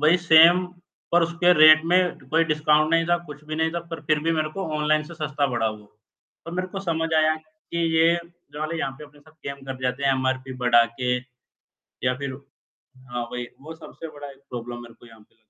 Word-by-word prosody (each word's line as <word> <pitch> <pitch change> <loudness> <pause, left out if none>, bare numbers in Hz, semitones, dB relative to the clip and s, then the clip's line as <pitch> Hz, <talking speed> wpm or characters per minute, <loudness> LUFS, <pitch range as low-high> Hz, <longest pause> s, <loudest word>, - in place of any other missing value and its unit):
वही 155 +4 +5
सेम 170 +3 +7 0.5
पर 175 0 +5
उसके 175 +1 +3
रेट 155 0 +7
में 175 +2 +4 0.3
कोई 165 +3 +3
डिस्काउंट 150 0 +2
नहीं 165 0 +3
था, 175 0 +3
कुछ 150 -4 -12
भी 155 0 -5
नहीं 160 0 +1
था 170 - -2
पर 165 -2 -6
फिर 155 0 +2
भी - - +3
मेरे 155 -1 0
को 190 +4 -5
ऑनलाइन 155 0 +1
से 170 +3 -11
सस्ता 150 -2 -1
पड़ा 120 -2 0
वो। 105 -1 -11 0.6
तब 165 - -7
मेरे 185 +1 -3
को 195 +1 -6
समझ 165 -3 -1
आया 155 0 +3
कि 155 +1 -10 0.2
ये 165 +1 +5 0.4
जो 150 +1 -6
हमें 160 +2 -3
यहाँ 135 -4 -2
पे 150 - -9
अपने 145 0 -19
साथ 155 +2 -21
गेम 140 0 -4
कर 135 - -3
दिए 130 - -13
जाते 130 +3 -4
हैं 135 - +4
एमआरपी 130 0 -2
बढ़ा 120 -1 +5 0.2
के 125 0 +1 0.9
या 125 0 +2
फिर 140 -1 -4 0.8
हाँ, 120 0 -3
वही 125 0 -4
वो 160 +3 -9
सबसे 165 0 -10
बड़ा 145 -1 -10
एक 135 - -16
प्रॉब्लम 120 -1 -6
मेरे 115 -1 -13
को 120 - -18
यहाँ 115 -1 -17
पे। 105 - -26
155 Hz, 225 wpm, -24 LUFS, 130-165 Hz, 0.9 s, सेम